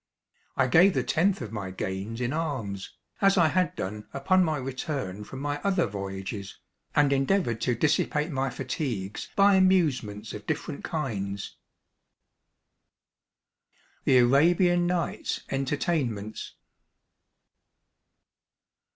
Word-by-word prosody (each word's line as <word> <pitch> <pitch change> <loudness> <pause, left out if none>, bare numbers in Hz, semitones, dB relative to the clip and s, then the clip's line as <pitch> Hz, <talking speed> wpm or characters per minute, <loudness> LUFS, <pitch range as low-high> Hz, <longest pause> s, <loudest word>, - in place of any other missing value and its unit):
I - - +4
gave 180 +9 +5
the - - +1
tenth 185 +2 +1
of 110 - -7
my 105 -4 -4
gains 95 +5 -4
in 125 +2 -1
alms, 125 - -4 0.2
as 195 0 +4
I 165 -3 +5
had 180 +1 +1
done 105 +2 -5
upon 185 +7 +3
my 155 -3 0
return 130 - -4
from 130 - -9
my 145 0 -2
other 190 -3 +2
voyages, 100 0 -6 0.4
and 145 -1 +4
endeavoured 135 - +1
to 125 - +1
dissipate 150 +4 +1
my 135 -1 0
fatigues 125 - -4
by 200 0 +6
amusements 150 - +2
of 105 - -8
different 155 -1 -3
kinds. 100 -10 -3 2.5
"The 130 - +5
Arabian 175 +8 +4
Nights 175 -1 -2
Entertainments." 135 - -2
135 Hz, 110 wpm, -27 LUFS, 105-165 Hz, 2.5 s, by